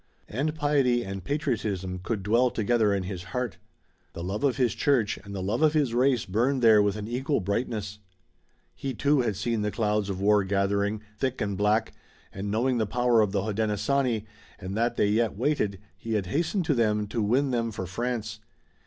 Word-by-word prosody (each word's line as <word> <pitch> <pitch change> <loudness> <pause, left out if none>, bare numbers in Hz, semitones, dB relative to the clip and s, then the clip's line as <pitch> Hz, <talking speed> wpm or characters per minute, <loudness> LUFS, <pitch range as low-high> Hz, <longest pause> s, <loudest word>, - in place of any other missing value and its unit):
And 150 +7 -2
piety 140 -5 +2
and 95 -1 -6
patriotism 110 - -2
could 105 0 -3
dwell 115 +5 +3
together 110 -1 +1
in 100 -2 0
his 90 -1 -5
heart. 125 -4 -2 0.5
The 85 - -6
love 100 +6 -3
of 135 -3 +2
his 125 -6 +2
church 125 -8 +1
and 100 0 -8
the 95 - -3
love 105 +8 -1
of 155 -1 +4
his 145 -7 +1
race 125 -1 +2
burned 120 +7 0
there 110 -2 +7
with 100 -1 +1
an 105 0 -5
equal 130 +5 0
brightness. 105 0 -3 0.7
He, 135 -2 -5
too, 145 +3 +2
had 110 -4 -1
seen 115 +1 -1
the 105 - 0
clouds 105 -1 0
of 95 -1 -3
war 105 +1 +4
gathering, 100 +2 0 0.2
thick 130 -1 -1
and 100 -1 -1
black, 105 +3 +1 0.4
and 100 +2 -4
knowing 120 +4 +1
the 110 - 0
power 120 0 +3
of 105 -2 +1
the 100 -2 0
Hodenosaunee, 110 +3 0 0.3
and 95 0 -6
that 115 +2 +1
they 100 - +2
yet 110 -1 +1
waited, 120 -6 0 0.2
he 110 +4 -5
had 100 -3 0
hastened 170 - -1
to 155 - +2
them 105 -4 +1
to 110 +2 -3
win 130 +6 +2
them 115 -2 0
for 95 -3 -5
France. 110 +2 -3
110 Hz, 195 wpm, -27 LUFS, 100-125 Hz, 0.7 s, there